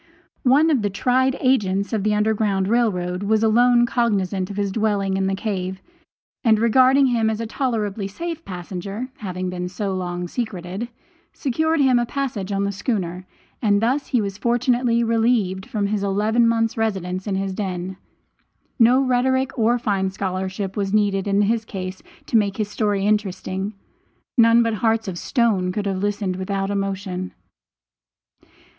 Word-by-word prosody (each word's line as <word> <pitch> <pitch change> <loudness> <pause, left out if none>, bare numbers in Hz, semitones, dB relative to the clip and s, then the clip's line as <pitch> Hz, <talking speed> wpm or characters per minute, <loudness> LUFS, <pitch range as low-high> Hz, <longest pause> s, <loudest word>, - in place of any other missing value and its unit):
One 300 +5 +5
of 270 -6 +2
the 205 - 0
tried 260 +6 +1
Agents 200 -6 +1
of 215 -3 0
the 210 0 +2
Underground 210 -2 +1
Rail 235 +1 +3
Road 180 0 -3
was 215 +2 +1
alone 240 +2 +5
cognizant 200 -6 0
of 200 - -7
his 200 -1 0
dwelling 200 -2 0
in 190 0 0
the 195 - 0
cave, 190 -2 -3 0.6
and 220 -2 +5
regarding 255 +5 +5
him 230 -3 +2
as 220 0 -2
a 230 - -2
tolerably 220 -5 -2
safe 330 - -5
passenger 195 +6 -6
(having 185 -3 -4
been 180 0 -4
so 195 +1 -3
long 180 -1 -3
secreted), 195 -1 -4 0.5
secured 315 +4 0
him 260 -3 +4
a 240 - -1
passage 245 -9 -3
on 200 0 0
the 200 - 0
schooner, 185 -4 -3 0.3
and 205 -3 +3
thus 255 +6 0
he 245 - +1
was 200 -1 -4
fortunately 240 0 +2
relieved 225 -5 +1
from 210 -2 -1
his 205 0 -1
eleven 210 +4 +2
months' 225 -1 +1
residence 190 -4 -2
in 200 - 0
his 195 0 -2
den. 185 -2 -4 0.8
No 245 +3 +5
rhetoric 260 +1 +1
or 235 +1 +2
fine 200 -5 0
scholarship 190 0 -3
was 195 -2 -1
needed 200 -2 +1
in 200 +1 +3
his 225 +2 +1
case 185 -3 -6 0.2
to - - -3
make 200 -2 +1
his 210 -2 -1
story 205 -2 0
interesting. 200 -1 -1 0.6
None 230 -1 +6
but 230 -1 0
hearts 225 +1 +1
of 175 -3 -4
stone 215 -8 +1
could 205 +2 -3
have 195 -1 -1
listened 200 -2 -1
without 195 +1 -2
emotion. 195 -2 -3
205 Hz, 165 wpm, -22 LUFS, 190-235 Hz, 0.8 s, None